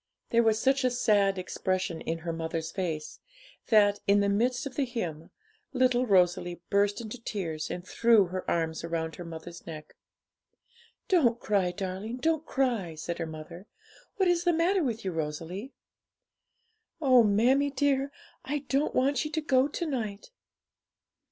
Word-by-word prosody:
There 235 - +5
was 220 -1 +2
such 270 +3 +2
a 255 - +4
sad 205 -5 +2
expression 185 -2 -2
in 165 - -2
her 165 - -2
mother's 165 0 -3
face, 160 -5 -4 0.5
that, 205 -3 +4
in 200 +1 +5
the 200 0 +2
midst 240 +5 +1
of 275 - -6
the 285 - +1
hymn, 175 -11 -5 0.4
little 255 -1 +2
Rosalie 180 -2 +2
burst 205 +2 +2
into 230 +2 -8
tears, 165 -9 -4
and 175 0 -5
threw 230 -4 +4
her 185 +1 -5
arms 160 -1 -1
round 165 -1 -3
her 175 - -6
mother's 165 +1 -9
neck. 155 -2 -9 1.1
'Don't 250 -11 +3
cry, 200 -6 +1
darling, 195 +5 -4
don't 315 +3 0
cry!' 235 - 0
said 170 +2 -5
her 165 - -2
mother; 160 +4 -9 0.5
'what 385 -4 +2
is 350 -1 +2
the 350 -1 +3
matter 345 +3 +2
with 230 -6 -3
you, 190 - -1
Rosalie?' 165 - -4 1.3
'Oh, 255 -5 +6
mammie 245 +7 +3
dear, 275 0 +1 0.3
I 290 +1 -3
don't 275 +2 +1
want 270 +1 +2
you 305 - -4
to 315 - -1
go 265 -2 +3
to 320 +4 -4
night!' 225 - -4
205 Hz, 160 wpm, -28 LUFS, 175-260 Hz, 1.3 s, Oh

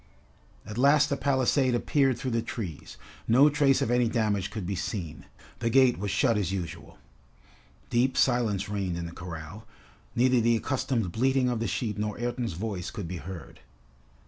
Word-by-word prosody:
At 105 +3 -6
last 145 +2 +5
the 140 - +1
palisade 130 -2 +2
appeared 135 +1 +2
through 130 +1 -3
the 115 0 +1
trees. 100 -9 -7 0.3
No 135 +6 +6
trace 140 -2 +3
of 115 - -1
any 120 -1 +3
damage 105 -5 0
could 105 -3 -5
be 100 - -2
seen. 85 -3 -5 0.3
The 115 - 0
gate 130 -3 +4
was 100 +1 -2
shut 115 +2 +2
as 95 -3 -1
usual. 90 -4 -6 0.9
Deep 125 +2 +2
silence 115 -6 +2
reigned 100 -4 -2
in 85 - -4
the 85 - -7
corral. 90 +5 -8 0.5
Neither 125 0 +3
the 115 +1 +3
accustomed 120 -6 -1
bleating 130 +4 +2
of 120 -2 -1
the 115 - -1
sheep 105 +2 -2
nor 105 0 -2
Ayrton's 120 -3 -2
voice 95 -1 -4
could 100 -5 -6
be 90 +1 -5
heard. 85 -2 -9
115 Hz, 170 wpm, -28 LUFS, 95-125 Hz, 0.9 s, No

